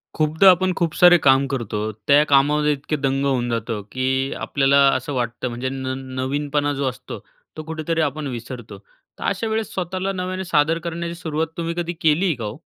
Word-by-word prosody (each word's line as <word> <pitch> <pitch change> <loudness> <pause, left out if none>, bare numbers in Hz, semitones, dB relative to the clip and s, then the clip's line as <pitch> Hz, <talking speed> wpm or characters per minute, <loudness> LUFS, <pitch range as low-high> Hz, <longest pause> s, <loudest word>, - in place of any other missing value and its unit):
खूपदा 160 +5 +4
आपण 185 +1 +1
खूप 170 -2 0
सारे 175 -1 +7
काम 135 0 +5
करतो, 110 -5 -3
त्या 125 +8 +3
कामामध्ये 150 +1 +3
इतके 145 +2 -3
दंग 135 0 0
होऊन 125 -3 0
जातो, 115 -2 -2
की 130 +1 -1
आपल्याला 140 0 +2 0.2
असं 130 +3 -3
वाटतं 120 0 -2
म्हणजे 120 +2 -3
न 130 -1 -4 0.3
नवीनपणा, 145 +2 -1
जो 140 0 -2
असतो 125 - -9 0.4
तो 155 - -5
कुठेतरी 160 +1 -2
आपण 150 0 -2
विसरतो. 120 -2 -7
तर, - - -17
अशा 225 - -1
वेळेस 220 -1 -2
स्वतःला 185 +1 -2
नव्याने 185 0 -4
सादर 160 -1 +2
करण्याची 170 0 -5
सुरुवात, 160 -2 -2
तुम्ही 170 0 -2
कधी 175 0 -2
केली 165 +3 +3
का 120 - -7
हो? 105 +4 -6
145 Hz, 180 wpm, -21 LUFS, 130-170 Hz, 0.4 s, सारे